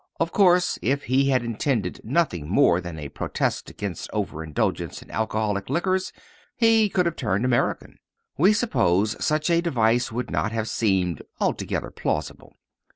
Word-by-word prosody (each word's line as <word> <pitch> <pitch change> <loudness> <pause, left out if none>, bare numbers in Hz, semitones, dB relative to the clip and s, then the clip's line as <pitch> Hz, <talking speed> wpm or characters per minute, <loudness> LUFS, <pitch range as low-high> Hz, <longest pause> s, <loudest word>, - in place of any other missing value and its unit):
Of 165 0 0
course, 180 -3 +3
if 140 +5 0
he 135 +2 +2
had 130 -3 +2
intended 115 -4 -2
nothing 110 - 0
more 90 -5 +4
than 85 -2 -7
a 75 -2 -6
protest - - -2
against 100 -5 -6
overindulgence 80 -1 -2
in - - -16
alcoholic 110 -2 -1
liquors 185 +5 0 0.4
he 225 -3 +4
could 180 -2 +1
have 170 -1 -1
turned 105 -2 -1
American. 120 -2 -1 0.4
We 185 +8 +5
suppose 105 - +1
such 155 +2 +1
a 170 0 +3
device 120 -7 +1
would 120 +3 -4
not 110 - -1
have 115 -1 -2
seemed 95 -7 0 0.2
altogether - - -2
plausible. - - -4
120 Hz, 150 wpm, -24 LUFS, -, 0.4 s, We